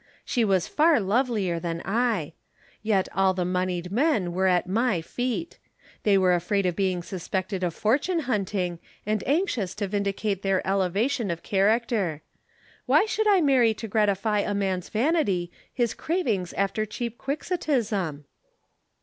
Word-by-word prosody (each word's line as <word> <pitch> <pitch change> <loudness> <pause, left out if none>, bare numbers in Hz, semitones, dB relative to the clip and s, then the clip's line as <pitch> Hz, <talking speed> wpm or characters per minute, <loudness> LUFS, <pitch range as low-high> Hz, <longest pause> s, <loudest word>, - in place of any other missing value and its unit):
She 240 - +1
was 190 -4 +2
far 315 -2 +4
lovelier 205 -4 0
than 170 -1 -3
I. 210 -7 0 0.5
Yet 205 -3 +1
all 190 -1 +2
the 180 -1 -1
moneyed 180 -1 -2
men 225 - +1
were 190 +1 +1
at 180 -1 +2
my 210 +1 +1
feet. 245 - -4 0.4
They 200 -2 +4
were 185 -1 +4
afraid 190 +3 0
of 180 -2 0
being 185 -3 0
suspected 185 +1 -3
of 175 -2 -1
fortune 290 +10 +1
hunting 195 - -2 0.3
and 215 0 -1
anxious 260 - 0
to 205 -1 -2
vindicate 200 0 -1
their 195 -1 0
elevation 200 +5 0
of 170 -1 -4
character. 200 -5 +1 0.6
Why - - +5
should 435 0 0
I 395 -3 +5
marry 255 -7 +4
to 225 - -6
gratify 210 0 +1
a 205 0 -1
man's 190 -3 -1
vanity, 215 - +1 0.2
his 240 -3 0
cravings 235 - -1
after 200 +2 0
cheap 235 +2 -5
quixotism?" 230 - -2
200 Hz, 145 wpm, -26 LUFS, 185-240 Hz, 0.6 s, Why